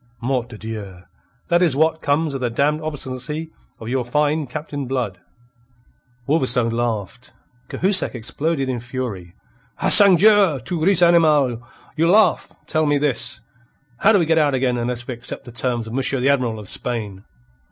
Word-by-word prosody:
Mort 125 0 -2
de 110 - -10
Dieu! 105 -5 -8 0.5
That 175 0 +3
is 165 -7 +2
what 160 +2 +1
comes 145 +1 0
of 135 - -5
the 125 - -1
damned 145 +6 0
obstinacy 150 +1 -5 0.3
of 110 - -9
your 125 +1 -1
fine 150 +4 -1
Captain 145 0 -6
Blood." 120 -8 -3 1.1
Wolverstone 125 -6 +1
laughed. 115 +1 -4 0.4
Cahusac 190 -5 +2
exploded 135 +5 -2
in 125 -2 -3
fury. 115 -8 -6 0.4
"Ah, - - +1
sangdieu! 200 -4 +6
Tu 165 0 -3
ris, 180 -1 +4
animal? 150 -8 +3 0.3
You 165 +2 +1
laugh! 205 -3 +3
Tell 155 -1 0
me 145 0 +2
this: 135 -5 0 0.6
How 220 - +4
do 210 - +4
we 175 - +1
get 160 0 +2
out 145 -3 +2
again 130 -1 0
unless 120 0 -3
we 130 - -4
accept 120 +1 -7
the 120 - -10
terms 120 -1 -2
of 110 - -9
Monsieur 135 +1 +1
the 130 +3 +1
Admiral 125 -5 0
of 105 -2 -9
Spain?" 105 -5 -1
135 Hz, 165 wpm, -20 LUFS, 120-155 Hz, 1.1 s, sangdieu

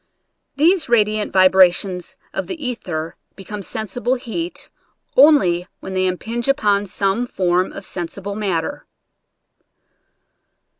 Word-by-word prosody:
These 325 +2 +3
radiant 215 -2 +2
vibra 185 -1 +6
tions 180 -1 -5 0.2
of - - -3
the 365 - -4
ether 180 - -4 0.2
become 200 +2 -7
sensible 230 +6 -2
heat 285 +8 -5 0.4
only 190 - +5
when 190 - -7
they 185 0 +1
impinge 225 +7 -3
upon 205 -8 +2
some 195 +6 0
form 180 -3 0
of 195 - -9
sensi 175 +1 -5
ble 200 +1 -5
matter. 190 -6 -3
200 Hz, 115 wpm, -20 LUFS, 185-245 Hz, 0.4 s, vibra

